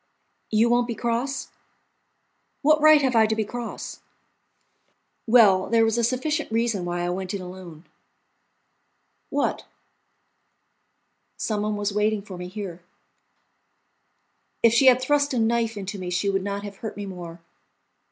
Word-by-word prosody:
"You 220 +2 +3
won't 240 0 +2
be 235 - -3
cross?" 235 +5 -2 1.1
"What 305 +1 +4
right 310 -1 +7
have 260 -2 +1
I 220 -1 +5
to 220 - 0
be 220 -1 -1
cross?" 240 +2 -6 1.3
"Well, 210 -5 +5
there 230 -1 +4
was 225 0 +1
a 235 - 0
sufficient 265 +5 -1
reason 225 -5 0
why 175 0 -2
I 175 - -1
went 185 +1 -4
in 195 - -5
alone." 180 -3 -11 1.4
"What?" - - -1 1.7
"Some 215 -2 -2
one 210 0 -1
was 205 0 -2
waiting 210 0 0
for 195 -3 -9
me 180 0 -7
here." 185 -3 -7 1.8
If 230 -1 +6
she 265 +3 +5
had 250 -1 +7
thrust 285 +1 +1
a - - 0
knife 230 -1 +1
into 200 +1 -5
me 180 -1 -5
she 180 +3 0
would 195 -1 -1
not 200 0 -4
have 200 -1 -8
hurt 220 0 -7
me 205 - -5
more. 175 -3 -8
215 Hz, 150 wpm, -24 LUFS, 190-235 Hz, 1.8 s, right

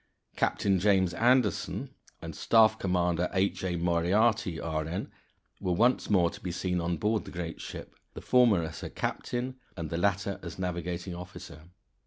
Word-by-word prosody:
Captain 95 -2 +1
James 95 -2 +3
Anderson 120 +2 +1 0.3
and - - -6
Staff 110 -1 +4
Commander 90 -2 +1
H. 95 +1 0
A. 90 -2 -1
Moriarty, 90 +3 +2
R.N., 80 +3 -3 0.5
were 90 -2 0
once 120 +8 +2
more 90 -5 +3
to - - -11
be 90 - -3
seen 90 0 -1
on 85 0 -1
board 105 +4 0
the - - -10
great 85 -2 -5
ship, - - -8 0.2
the - - -5
former 120 -8 +4
as 80 -1 -6
her - - -5
captain, 125 +1 -3 0.2
and 80 -3 -5
the 85 - -1
latter 100 +1 0
as - - -8
navigating 90 0 -3
officer. 85 -3 -10
90 Hz, 160 wpm, -29 LUFS, 85-105 Hz, 0.5 s, Staff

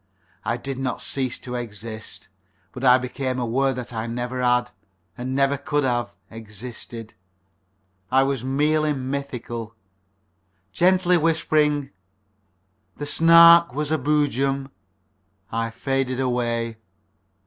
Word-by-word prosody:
I 115 +3 -1
did 135 +1 -5
not 130 -2 -2
cease 130 -2 -2
to 125 - -8
exist, 110 -2 -7 0.4
but 125 - -8
I 125 -1 +7
became 130 0 -3
aware 130 +3 +1
that 125 -1 -6
I 110 0 -3
never 125 +2 -3
had, 125 0 +2 0.4
and 130 +3 -4
never 140 +1 +2
could 145 +1 -1
have, 120 -2 -1 0.2
existed. 115 +1 -9 1.0
I 135 +1 +5
was 135 -3 -1
merely 150 +3 +1
mythical. 130 -4 -5 1.0
Gently 180 - +3
whispering 155 -3 +1 1.1
"The 145 - -4
Snark 170 -1 +7
was 150 0 -2
a 155 - +2
Boojum," 140 -1 0 0.8
I 115 0 -1
faded 135 +2 -2
away. 120 -3 -1
130 Hz, 115 wpm, -23 LUFS, 120-145 Hz, 1.1 s, I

